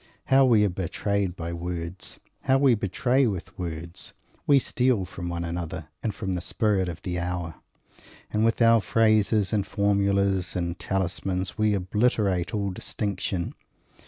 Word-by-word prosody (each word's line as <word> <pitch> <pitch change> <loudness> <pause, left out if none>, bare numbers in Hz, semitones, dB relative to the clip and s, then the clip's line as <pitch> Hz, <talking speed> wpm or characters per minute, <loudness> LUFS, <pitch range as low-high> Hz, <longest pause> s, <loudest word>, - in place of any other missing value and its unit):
How 135 0 +7
we 110 -5 +5
are - - +2
betrayed 95 +1 -1
by 85 -1 -5
words! 85 +1 -5 0.3
How 135 0 +4
we 135 -2 +5
betray 120 +6 +1
with 95 -6 -4
words! 85 0 -6 0.3
We 140 - +6
steal 125 -6 +1
from 85 -1 -6
one 85 0 -3
another 85 -1 -5
and 110 - -1
from 95 -2 -4
the 90 - -2
spirit 100 -2 +1
of 85 0 -8
the 90 -1 -2
hour; 85 -3 -3 0.8
and 105 +1 +2
with 115 +1 +3
our 115 -1 +6
phrases 110 -2 +2
and 105 -2 +2
formulas 100 -1 +1
and 85 0 -2
talismans 95 0 -2
we 110 -1 +2
obliterate 100 -1 +1
all 100 -2 -1
distinction. 95 -2 -3
95 Hz, 150 wpm, -26 LUFS, 90-110 Hz, 0.8 s, How